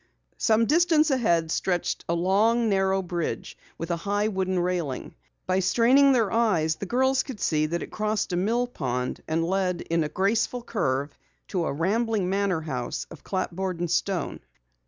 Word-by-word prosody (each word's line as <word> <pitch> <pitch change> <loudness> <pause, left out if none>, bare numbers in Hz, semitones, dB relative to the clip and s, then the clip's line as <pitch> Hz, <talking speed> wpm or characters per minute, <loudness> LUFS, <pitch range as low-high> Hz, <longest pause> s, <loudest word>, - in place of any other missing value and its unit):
Some 225 0 +3
distance 315 +1 +3
ahead 170 -11 +2
stretched 175 0 -1
a 170 - +2
long, 215 +6 +2
narrow 195 -1 +1
bridge 175 -2 -4 0.2
with 165 +1 -4
a 170 - 0
high 205 +4 0
wooden 190 -2 -1
railing. 175 -6 -2 0.3
By 185 0 +1
straining 245 +9 +4
their 230 -6 +2
eyes 190 -9 +2
the 200 - -6
girls 260 +3 +2
could 260 -6 -8
see 155 -1 +1
that 170 +2 -2
it - - -9
crossed 215 -3 -1
a - - +2
mill 225 +7 +1
pond 125 - -3
and 165 +1 0
led 180 -1 0
in 165 -1 +2
a 150 - -3
graceful 220 +8 0
curve 140 - -1 0.3
to 180 -4 -1
a - - -1
rambling 200 +5 0
manor 195 -4 0
house 130 -6 -4
of - - -12
clapboard 185 -1 -3
and 175 -1 -2
stone. 180 -2 -1
190 Hz, 170 wpm, -26 LUFS, 170-225 Hz, 0.3 s, straining